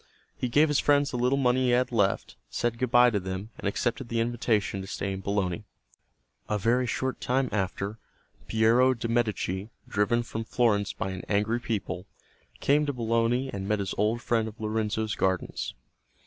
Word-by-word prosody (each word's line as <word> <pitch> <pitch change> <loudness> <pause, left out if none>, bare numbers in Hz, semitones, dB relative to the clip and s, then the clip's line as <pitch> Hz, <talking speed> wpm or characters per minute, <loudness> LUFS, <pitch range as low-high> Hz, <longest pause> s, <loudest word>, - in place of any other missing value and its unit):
He 125 - -2
gave 150 +6 +5
his 150 -2 +2
friends 145 0 +3
the 125 - -2
little 125 +3 +2
money 130 -1 +2
he - - +2
had 125 +1 +2
left, 100 -4 +1
said 120 -1 -1
good 130 -1 0
bye 120 0 +6
to 105 - +1
them, 95 +3 -5
and - - -2
accepted 120 +4 -1
the 115 - 0
invitation 115 -4 0
to 95 - -8
stay 100 0 -3
in 95 - -5
Bologna. 100 0 -1 0.9
A 105 - +1
very 120 +5 +2
short 130 +2 -2
time 130 0 +1
after, 100 +1 -2 0.5
Piero 115 +4 +4
de' 115 0 -3
Medici, 105 -4 -1 0.2
driven 120 +4 +1
from 115 -1 -4
Florence 110 -3 +1
by 95 - -4
an 95 -1 -5
angry 105 +3 +1
people, 105 -6 -3 0.5
came 150 +1 +3
to 145 - 0
Bologna 115 +2 +1
and 95 -1 -4
met 105 +1 +2
his 100 -2 -3
old 110 +3 0
friend 115 -2 +1
of 110 - -9
Lorenzo's 110 0 -1
gardens. 95 -2 -1
115 Hz, 180 wpm, -28 LUFS, 100-125 Hz, 0.9 s, bye